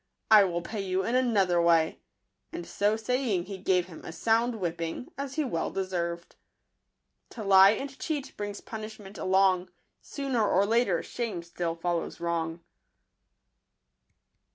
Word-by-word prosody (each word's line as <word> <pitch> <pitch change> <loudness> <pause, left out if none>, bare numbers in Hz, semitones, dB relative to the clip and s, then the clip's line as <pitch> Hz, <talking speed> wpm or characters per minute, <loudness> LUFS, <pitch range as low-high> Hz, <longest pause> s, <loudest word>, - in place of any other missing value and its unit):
I 210 -2 +9
will 175 -2 -2
pay 210 +3 -4
you 190 0 -1
in 230 - -2
another 200 -9 +3
way 165 -2 +3 0.5
and 175 - -6
so 205 +4 +1
saying, 225 -5 0
he 195 0 -7
gave 180 -2 +2
him 175 -3 -12
a - - -7
sound 230 +6 +1
whipping, 170 +2 -4
as 275 -1 -5
he 310 - +1
well 165 - -2
de 195 0 -2
served. 170 -2 -4 0.9
To 225 - -7
lie 195 0 +7
and 270 +4 -6
cheat 295 -4 -4
brings 205 -1 -5
punishment 215 -2 -8
along; 185 -1 +3 0.3
Sooner 270 -5 -2
or 195 +2 +3
later 220 -5 +2
shame 215 -8 -4
still 170 -1 -3
follows 170 0 -2
wrong. 170 -1 -2
195 Hz, 145 wpm, -28 LUFS, 175-225 Hz, 0.9 s, I